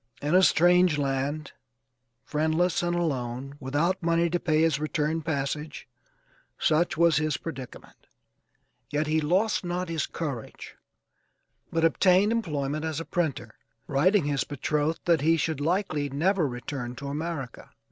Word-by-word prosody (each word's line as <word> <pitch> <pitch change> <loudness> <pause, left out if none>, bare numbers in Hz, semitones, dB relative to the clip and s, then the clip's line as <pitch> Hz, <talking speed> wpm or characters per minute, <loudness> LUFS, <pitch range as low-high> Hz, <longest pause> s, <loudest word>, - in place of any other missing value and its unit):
In 145 +3 -1
a 185 - +7
strange 180 -2 +4
land, 140 +2 -2 0.7
friendless 160 +4 +1
and 175 0 0
alone, 135 -5 -2
without 150 +8 0
money 170 0 +1
to 175 - +1
pay 155 -2 +1
his 160 -3 +2
return 155 +1 -1
passage, 150 -1 -3 0.7
such 160 +1 +1
was 170 -1 +4
his 155 -2 0
predicament; 135 -7 -9 0.8
yet 150 +1 0
he 155 +1 +1
lost 190 +9 +1
not 180 0 -3
his 165 -2 -1
courage, 140 -8 -6 1.0
but 165 0 +2
obtained 185 +5 +4
employment 155 -9 -2
as 160 -1 -2
a 165 - -5
printer, 155 -10 -2 0.3
writing 165 - +2
his 145 -2 0
betrothed 150 +3 -1
that 170 -3 +3
he 165 +2 +3
should 155 -1 -1
likely 155 -3 0
never 165 +4 +1
return 125 0 -5
to 140 - -8
America. 145 -2 -5
155 Hz, 135 wpm, -27 LUFS, 145-170 Hz, 1.0 s, a